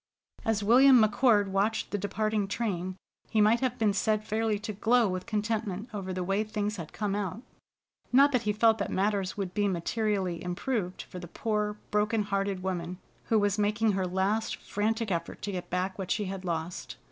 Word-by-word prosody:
As 220 Hz, -2 st, 0 dB
William 255 Hz, +4 st, +7 dB
McCord 215 Hz, -1 st, +4 dB
watched 205 Hz, +3 st, 0 dB
the 205 Hz, -, 0 dB
departing 215 Hz, +1 st, -1 dB
train, 185 Hz, -4 st, -2 dB, 0.3 s
he 220 Hz, -, +1 dB
might 215 Hz, +3 st, +5 dB
have 255 Hz, -2 st, -1 dB
been 215 Hz, -4 st, +2 dB
said 215 Hz, +1 st, +1 dB
fairly 220 Hz, 0 st, 0 dB
to 215 Hz, +1 st, -5 dB
glow 230 Hz, +3 st, +3 dB
with 185 Hz, +2 st, -4 dB
contentment 215 Hz, -1 st, -2 dB
over 195 Hz, -2 st, -4 dB
the 185 Hz, 0 st, -2 dB
way 195 Hz, +3 st, +1 dB
things 210 Hz, -1 st, -3 dB
had 165 Hz, -3 st, -7 dB
come 205 Hz, -2 st, -2 dB
out. 205 Hz, +3 st, -3 dB, 0.7 s
Not 275 Hz, +3 st, +6 dB
that 250 Hz, -3 st, +2 dB
he 210 Hz, -2 st, 0 dB
felt 220 Hz, +1 st, +3 dB
that 200 Hz, -, -2 dB
matters 195 Hz, -1 st, 0 dB
would 190 Hz, -3 st, -3 dB
be 205 Hz, -1 st, +1 dB
materially 190 Hz, -1 st, -1 dB
improved 180 Hz, +1 st, -2 dB
for 180 Hz, -, -9 dB
the 175 Hz, -, -8 dB
poor 210 Hz, +2 st, -2 dB
broken 210 Hz, +1 st, +2 dB
hearted 195 Hz, -2 st, -2 dB
woman 180 Hz, -1 st, -3 dB, 0.3 s
who 225 Hz, -, +2 dB
was 205 Hz, 0 st, +1 dB
making 210 Hz, +1 st, +2 dB
her 190 Hz, -2 st, -1 dB
last 195 Hz, +5 st, 0 dB
frantic 220 Hz, +1 st, -2 dB
effort 170 Hz, -1 st, -3 dB
to 205 Hz, -, -2 dB
get 180 Hz, -2 st, -5 dB
back 185 Hz, +2 st, -2 dB
what 190 Hz, -1 st, -4 dB
she 210 Hz, -, 0 dB
had 190 Hz, 0 st, -5 dB
lost. 170 Hz, 0 st, -4 dB
205 Hz, 190 wpm, -29 LUFS, 190-220 Hz, 0.7 s, William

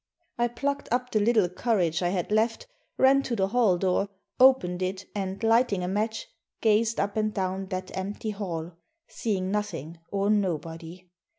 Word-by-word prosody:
I 240 Hz, -, +3 dB
plucked 280 Hz, +4 st, -3 dB
up 250 Hz, +1 st, 0 dB
the 215 Hz, -, +2 dB
little 215 Hz, -2 st, +3 dB
courage 180 Hz, -3 st, 0 dB
I 175 Hz, -, +1 dB
had 180 Hz, +1 st, -2 dB
left, 225 Hz, -, +1 dB, 0.3 s
ran 270 Hz, +1 st, +5 dB
to 250 Hz, -3 st, -2 dB
the 195 Hz, -2 st, +1 dB
hall 220 Hz, -5 st, +3 dB
door, 190 Hz, +2 st, +1 dB, 0.3 s
opened 250 Hz, -9 st, +5 dB
it, 185 Hz, +1 st, -2 dB
and, 195 Hz, +1 st, -4 dB
lighting 225 Hz, -4 st, +3 dB
a -, -, -2 dB
match, 215 Hz, +4 st, -2 dB, 0.3 s
gazed 220 Hz, +1 st, +2 dB
up 200 Hz, +1 st, -1 dB
and 215 Hz, 0 st, +1 dB
down 190 Hz, -1 st, -2 dB
that 185 Hz, -1 st, -5 dB
empty 205 Hz, +3 st, -3 dB
hall, 175 Hz, -5 st, -4 dB, 0.4 s
seeing 190 Hz, -4 st, -2 dB
nothing 170 Hz, -6 st, -3 dB
or 200 Hz, +1 st, +1 dB
nobody. 170 Hz, -2 st, -2 dB
200 Hz, 165 wpm, -27 LUFS, 185-225 Hz, 0.4 s, ran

